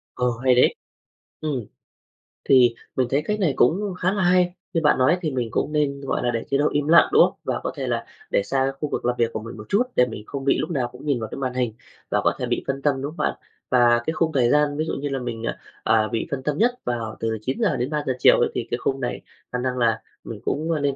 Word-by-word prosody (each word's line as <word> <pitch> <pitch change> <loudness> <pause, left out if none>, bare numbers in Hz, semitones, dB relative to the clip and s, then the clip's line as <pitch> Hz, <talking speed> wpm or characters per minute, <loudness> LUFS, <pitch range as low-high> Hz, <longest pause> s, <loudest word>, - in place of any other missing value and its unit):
Ờ, 125 0 +1 0.2
hay 130 -1 +5
đấy. 125 - +4 0.7
Ừm. 140 -8 -3 0.8
Thì 125 -3 +5 0.2
mình 130 -2 +1
thấy 140 +2 +2
cách 210 0 -1
này 160 -8 +2
cũng 190 +9 +2
khá 185 - +2
là 195 -3 0
hay, 180 0 +3 0.2
như 165 - +1
bạn 150 - +4
nói 150 +8 +4
thì 155 -3 -1
mình 125 -3 -1
cũng 150 - -1
nên, 140 -2 0
gọi 135 - -2
là, 120 - +1
để 115 - -2
chế 140 - +2
độ 145 +2 +2
im 145 0 -1
lặng, 170 - +6
đúng - - +7
không? - - +1
Và - - -2
có - - -2
thể - - -4
là - - -1 0.3
để - - +2
xa 135 +5 0
khu 150 - -2
vực - - -3
làm 125 - +1
việc 115 -1 +1
của - - -2
mình 115 +1 -9
một 105 - -9
chút 210 +5 +3
để 125 - +5
mình 110 -3 -7
không 140 -1 -5
bị 140 - +3
lúc 155 - -2
nào 130 -6 0
cũng 125 +4 -12
nhìn 140 -5 +1
vào 110 - -5
cái - - -6
màn 130 -2 -2
hình 125 -3 -1 0.4
và - - +2
có - - +3
thể - - -1
bị - - -1
phân 135 0 -2
tâm, 135 -2 +1
đúng 140 - -3
không 170 - -15
bạn? - - 0 0.4
Và 120 -1 +4
cái 160 - 0
khung 160 0 0
thời 120 -3 +3
gian 150 0 +2
ví 155 - 0
dụ - - -3
như 145 +1 -3
là 135 -1 -2
mình, 115 -2 -5
ờ, - - -2 0.4
à, 110 -1 +3
bị 115 0 -2
phân 130 -1 -3
tâm 150 +1 -1
nhất 240 +6 +4
vào 115 -3 -3
từ 115 -1 -1
9:00-3:00 145 - -1
chiều - - +6
ấy - - +3
thì 115 - -3
cái 120 - +1
khung 135 +2 -1
này 125 - -3 0.3
khả 125 - -1
năng 125 0 -2
là 115 -2 +2 0.2
mình - - -7
cũng, 155 +3 -1
ờ, 160 - +1
nên 140 -1 0
135 Hz, 275 wpm, -23 LUFS, 120-150 Hz, 0.8 s, đúng